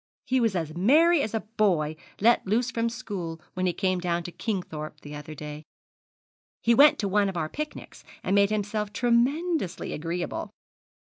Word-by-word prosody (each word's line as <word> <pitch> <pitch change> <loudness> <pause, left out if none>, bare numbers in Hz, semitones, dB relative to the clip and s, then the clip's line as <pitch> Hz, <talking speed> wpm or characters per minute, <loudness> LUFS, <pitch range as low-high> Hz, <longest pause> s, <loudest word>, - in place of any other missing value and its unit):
He 260 0 +2
was 225 -5 +1
as 160 -2 -2
merry 300 - +5
as 220 -3 -2
a 220 - 0 0.2
boy 160 -8 +2 0.2
let 230 -1 +4
loose 235 +5 +1
from 230 0 0
school 195 -9 -5
when 185 0 0
he - - +2
came 185 -1 0
down 175 -1 -1
to 175 - -7
Kingthorpe 175 -8 -4
the 145 - -9
other 150 +1 -8
day. 150 0 -7 1.0
He 235 - +5
went 285 +5 +7
to 205 - -1
one 200 +1 +2
of 185 - -5
our 155 -2 -1
picnics, 305 - -7 0.2
and 190 - 0
made 200 0 +5
himself 210 0 -2
tremendously 245 - +1
agreeable. 170 +3 -3
200 Hz, 170 wpm, -27 LUFS, 170-235 Hz, 1.0 s, went